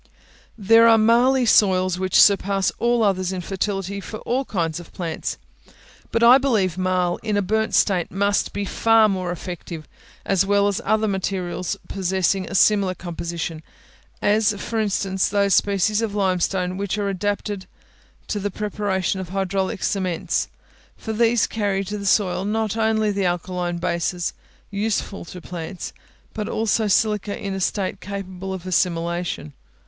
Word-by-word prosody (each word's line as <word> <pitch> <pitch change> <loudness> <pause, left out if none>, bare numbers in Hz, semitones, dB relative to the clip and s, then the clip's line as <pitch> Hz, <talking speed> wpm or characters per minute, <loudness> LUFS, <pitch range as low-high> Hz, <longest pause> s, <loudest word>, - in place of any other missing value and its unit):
There 225 +2 +6
are 225 -1 +7
marly 240 +4 +4
soils 185 -4 +3
which 185 -1 +2
surpass 195 -1 +4
all 235 -1 +2
others 185 -3 +1
in 185 -1 -3
fertility 195 +1 -3
for 215 - -7
all 260 +3 -1
kinds 170 -6 -2
of 175 - -12
plants; 165 -3 -4 0.7
but 230 - +1
I 245 +3 +8
believe 215 -10 +1
marl 185 -1 0
in 210 -2 -1
a - - +2
burnt 220 +3 0
state 180 -4 +2
must 200 +1 0
be 205 0 -3
far 225 +3 +4
more 185 -3 -2
effective, 175 -2 -7 0.4
as 195 -1 +2
well 200 +1 +2
as 200 -1 -1
other 215 0 +2
materials 190 -1 -2
possessing 190 0 0
a - - -5
similar 195 -2 +3
composition; 170 -2 -5 0.6
as, 210 0 +3
for 225 +1 -3
instance, 195 -2 0
those 200 -1 +2
species 205 +3 +2
of 215 -3 -2
limestone 185 -1 0
which 200 0 -2
are 205 -1 -1
adapted 200 0 -3 0.6
to 205 - -1
the 205 +1 -2
preparation 200 -2 -2
of 185 -2 -6
hydraulic 190 0 -2
cements, 185 -4 -1 0.5
for 220 - -5
these 230 +1 +3
carry 200 -3 -1
to 205 +2 -5
the 200 - -4
soil 190 -2 +2
not 215 +1 -1
only 220 -1 +1
the 200 -1 -1
alkaline 175 0 -2
bases 170 0 -1 0.4
useful 200 -2 -2
to 180 - -9
plants, 175 +1 -7 0.4
but 215 0 -4
also 220 -1 +1
silica 210 0 +1
in 200 -1 -4
a 195 - -3
state 190 0 -1
capable 190 -1 -6
of 185 -2 -6
assimilation. 170 - -1
195 Hz, 155 wpm, -22 LUFS, 185-210 Hz, 0.7 s, I